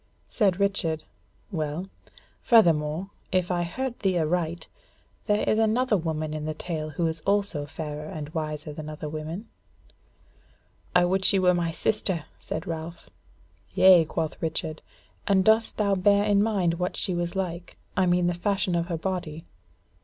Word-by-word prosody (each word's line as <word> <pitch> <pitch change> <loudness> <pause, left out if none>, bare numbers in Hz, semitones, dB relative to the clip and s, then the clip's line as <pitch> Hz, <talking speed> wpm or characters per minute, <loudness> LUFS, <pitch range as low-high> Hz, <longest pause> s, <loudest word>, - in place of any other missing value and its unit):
Said 195 -5 +1
Richard: 170 -6 +1 0.5
"Well, 160 +1 -3 0.5
furthermore, 170 -4 +3 0.2
if 185 -1 +1
I 175 -1 +1
heard 240 +9 -3
thee 190 -3 +1
aright, 170 +1 -1 0.6
there 210 -1 +1
is 215 - +3
another 225 +2 +2
woman 155 -3 -2
in 155 -1 -4
the 155 0 -3
tale 155 -2 -4
who 160 +3 -2
is 160 -1 -2
also 200 -6 0
fairer 150 0 -6
and 150 -2 -6
wiser 155 -1 -4
than 155 0 -7
other 155 0 -6
women?" 155 +7 -5 1.5
"I 180 0 +6
would 190 +2 +1
she 195 - +4
were 180 -1 +4
my 175 -1 0
sister!" 180 -1 -1
said - - -5
Ralph. 165 +1 -6 0.6
"Yea," 185 -3 +8
quoth 160 0 -3
Richard, 160 -1 -3 0.5
"and 190 -2 +3
dost 220 +1 +3
thou 200 -2 +2
bear 200 +2 +4
in 205 -1 +3
mind 190 -6 +1
what 180 0 -2
she 185 - -1
was 175 +1 -2
like? 175 -2 -4 0.2
I 185 -1 +3
mean 175 0 +3
the 175 - +2
fashion 190 +1 0
of 170 0 0
her 170 -3 -2
body." 165 -3 -4
175 Hz, 160 wpm, -26 LUFS, 160-195 Hz, 1.5 s, Yea